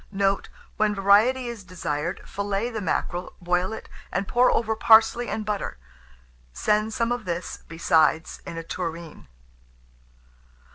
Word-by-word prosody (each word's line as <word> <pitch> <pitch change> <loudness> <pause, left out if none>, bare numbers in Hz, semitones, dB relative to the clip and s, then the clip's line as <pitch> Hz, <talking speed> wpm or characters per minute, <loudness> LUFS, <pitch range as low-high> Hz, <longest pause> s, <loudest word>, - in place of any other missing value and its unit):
Note. 195 0 0 0.3
When 210 -1 +2
variety 210 +7 +4
is 235 -4 -6
desired, 170 -2 -4
fillet 200 +3 -2
the 220 -2 -4
mackerel, 180 -1 -2
boil 180 +2 0
it, 220 - -7 0.2
and 195 +1 -1
pour 245 +1 +4
over 220 -1 +1
parsley 225 +2 +5
and 215 - -3
butter; 210 - -3 0.8
send 210 - +1
some 230 +1 0
of 245 -4 -2
this, 175 0 -4
besides, 160 -1 +2
in 165 - -7
a 165 - -4
tureen. 165 - -6
200 Hz, 135 wpm, -25 LUFS, 175-220 Hz, 0.8 s, parsley